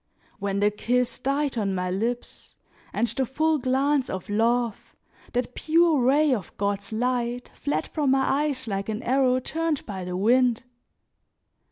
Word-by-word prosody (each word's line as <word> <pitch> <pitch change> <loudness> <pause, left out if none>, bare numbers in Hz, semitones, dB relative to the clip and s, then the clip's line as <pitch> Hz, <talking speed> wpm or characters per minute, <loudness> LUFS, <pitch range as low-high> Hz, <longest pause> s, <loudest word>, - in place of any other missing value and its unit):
When 200 0 -1
the 205 0 +4
kiss 245 +4 0
died 275 -1 0
on 195 -2 0
my 180 0 -1
lips, 230 +6 -3 0.4
and - - +1
the 235 +4 -1
full 310 +5 +1
glance 265 +2 +1
of 190 +3 -5
love, 230 +1 0 0.4
that 245 0 -1
pure 325 -2 +3
ray 285 +3 +4
of 205 -8 -5
God's 200 0 -2
light, 245 +1 -1
fled 285 - -2
from 295 -4 -1
my 270 0 +3 0.2
eyes 260 -4 -4
like 195 0 -3
an 220 +3 -3
arrow 255 0 +3
turned 320 +2 -2
by 190 -3 -5
the 180 0 -4
wind! 240 +4 +3
245 Hz, 155 wpm, -25 LUFS, 210-270 Hz, 0.4 s, the